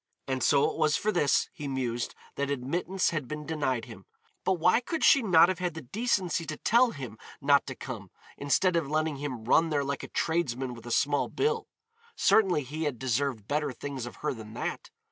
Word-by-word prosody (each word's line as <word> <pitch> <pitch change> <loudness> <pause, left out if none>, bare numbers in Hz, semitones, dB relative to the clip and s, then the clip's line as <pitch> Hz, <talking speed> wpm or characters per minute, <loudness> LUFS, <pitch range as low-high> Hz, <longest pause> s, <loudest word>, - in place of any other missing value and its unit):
And 130 -1 -1
so 145 +1 +4
it - - -8
was 155 -1 +3
for 215 - 0
this, 150 -8 +2
he 145 - -6
mused, 125 -3 -2 0.2
that 140 0 -2
admittance 170 +8 -1
had 155 -6 -3
been 150 +1 -6
denied 140 -7 -1
him. - - -12 0.4
But 190 - +2
why 180 +4 +3
could 315 +6 -3
she 280 - +7
not 175 -6 +6
have 185 -2 -2
had 180 -3 -2
the 160 - -7
decency 185 - 0
to 155 0 -4
tell 240 +3 +4
him 125 - -8 0.2
not 140 0 +3
to - - -5
come - - -7 0.3
instead 170 +6 +2
of 160 -5 0
letting 155 -1 0
him 135 -5 -5
run 165 +7 +4
there 145 -2 +1
like 140 +1 -3
a - - -7
tradesman 135 -6 -1
with 120 0 -11
a - - -5
small 145 +4 +2
bill? 450 +1 0 0.5
Certainly 185 -9 +3
he 155 +5 -4
had 145 -5 -2
deserved 130 -3 -1
better 150 -1 0
things 130 0 -6
of - - -9
her - - +1
than 110 -2 -10
that. - - -4
145 Hz, 205 wpm, -29 LUFS, 130-170 Hz, 0.5 s, she